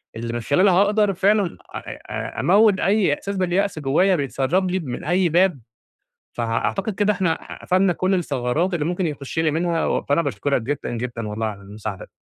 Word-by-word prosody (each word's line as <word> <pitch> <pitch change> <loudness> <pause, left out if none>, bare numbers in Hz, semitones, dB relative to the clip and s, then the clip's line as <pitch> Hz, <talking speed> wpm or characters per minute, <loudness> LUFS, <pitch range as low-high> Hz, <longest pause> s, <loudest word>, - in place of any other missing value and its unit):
اللي 115 +1 -4
من 120 - -2
خلالها 180 - +3
هاقدر 205 +2 +3
فعلًا 195 - +1 0.2
أ - - -6
أموّت 200 +1 +4
أي 200 -5 +2
إحساس 200 +7 -4
باليأس 185 0 0
جوايا 155 +7 +3
بيتسرب 150 +5 0
لي 190 - 0
من 130 -8 -6
أي 175 +2 +2
باب، 175 -2 +3 0.7
فأعتقد 120 - -1
كده 205 +1 +2
إحنا 180 -4 -2
قفلنا 185 0 +2
كلّ 185 +3 0
الثغرات 150 +1 0
اللي 155 -4 -1
ممكن 175 +2 -1
يخش 145 0 -5
لي 160 -1 +2
منها، 165 +1 0
و - - 0
فأنا 145 +4 +1
باشكرك 140 -6 -1
جدًا، 145 +5 -3
جدًا 120 -2 -4
والله 110 +1 -2
على 100 -2 -6
المساعدة. 100 0 -7
170 Hz, 170 wpm, -22 LUFS, 135-190 Hz, 0.7 s, أموّت